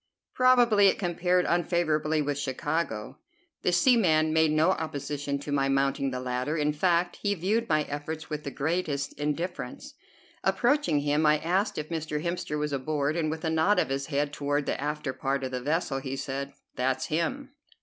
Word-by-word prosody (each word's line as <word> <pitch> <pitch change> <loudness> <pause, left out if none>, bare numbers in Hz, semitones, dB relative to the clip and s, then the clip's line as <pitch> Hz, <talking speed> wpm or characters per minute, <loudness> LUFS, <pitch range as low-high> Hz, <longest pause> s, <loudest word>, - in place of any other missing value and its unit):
Probably 245 -5 +5
it - - +3
compared 180 0 +1
unfavorably 160 -3 +1
with 145 0 -2
Chicago. 145 -4 -3 0.4
The - - +1
seaman 175 -6 +4
made 160 0 +4
no 155 +4 +3
opposition 145 -3 -3
to 140 +1 -7
my 135 -1 +1
mounting 135 0 +1
the 125 -1 -4
ladder; 125 +4 -2
in 150 0 +1
fact 175 +2 +1
he 205 -1 0
viewed 210 +6 0
my 155 -1 +3
efforts 150 +2 -5
with 150 -1 -5
the - - -4
greatest 145 -1 -2
indifference. 155 +5 -4 0.5
Approaching 285 - +2
him, 145 +2 +1
I 150 0 +5
asked 180 +6 0
if 150 0 -4
Mr. 155 -2 -3
Hemster 170 -3 -2
was 150 -1 -2
aboard, 145 +2 -1
and 160 -2 0
with 160 +2 -4
a 160 - +1
nod 160 +6 +3
of - - +2
his 135 0 -2
head 145 0 -1
toward 145 0 -1
the - - -2
after 150 -2 -2
part 135 +1 -2
of 130 - -3
the 125 -1 -3
vessel 150 -1 -1
he 135 0 -4
said, 140 +1 -4 0.2
"That's 130 +1 0
him." 260 - -2
150 Hz, 180 wpm, -28 LUFS, 140-170 Hz, 0.5 s, Probably